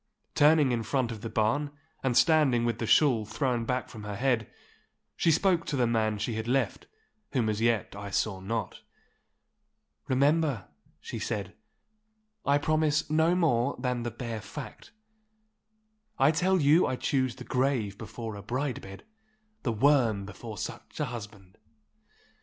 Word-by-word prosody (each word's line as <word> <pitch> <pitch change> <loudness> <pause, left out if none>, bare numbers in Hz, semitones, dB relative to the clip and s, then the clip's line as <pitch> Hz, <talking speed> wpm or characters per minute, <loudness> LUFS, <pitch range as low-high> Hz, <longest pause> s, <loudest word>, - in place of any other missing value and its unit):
Turning 150 -2 +5
in 120 -1 0
front 120 +1 -1
of 110 -2 -7
the 115 - -5
barn, 115 +7 +1 0.3
and 130 -3 +1
standing 145 -8 +4
with 120 -1 -1
the 115 - -2
shawl 125 -6 +4
thrown 120 +1 -1
back 125 +1 -1
from 110 -2 -10
her 105 -1 -5
head, 120 -1 0 0.6
she - - +2
spoke 170 +1 +3
to 150 - -3
the 125 -2 +2
man 110 -2 +1
she 110 +3 -2
had 110 +1 -4
left, 130 +1 0 0.5
whom 125 -5 +1
as 110 0 -1
yet 115 -4 +1
I 100 0 -6
saw 95 0 -1
not. 105 +1 -4 1.3
'Remember,' 140 - +2 0.3
she - - -6
said, - - -3 0.9
'I 140 0 +5
promise 155 0 +1
no 160 +3 +3
more 140 -7 +2
than 125 -2 -2
the 120 - -2
bare 115 -1 -5
fact. 130 +7 -9 1.3
I 135 +3 +5
tell 185 +4 +2
you 155 +4 +5
I 130 - -1
choose 130 -1 0
the 125 - -9
grave 125 -6 0
before 110 0 -6
a 100 - -8
bride 125 +5 -3
bed, 95 0 -11 0.6
the 120 - -1
worm 115 -4 +3
before 110 +2 -8
such - - -7
a 150 - +1
husband! 105 -6 -9
120 Hz, 155 wpm, -28 LUFS, 110-145 Hz, 1.3 s, Turning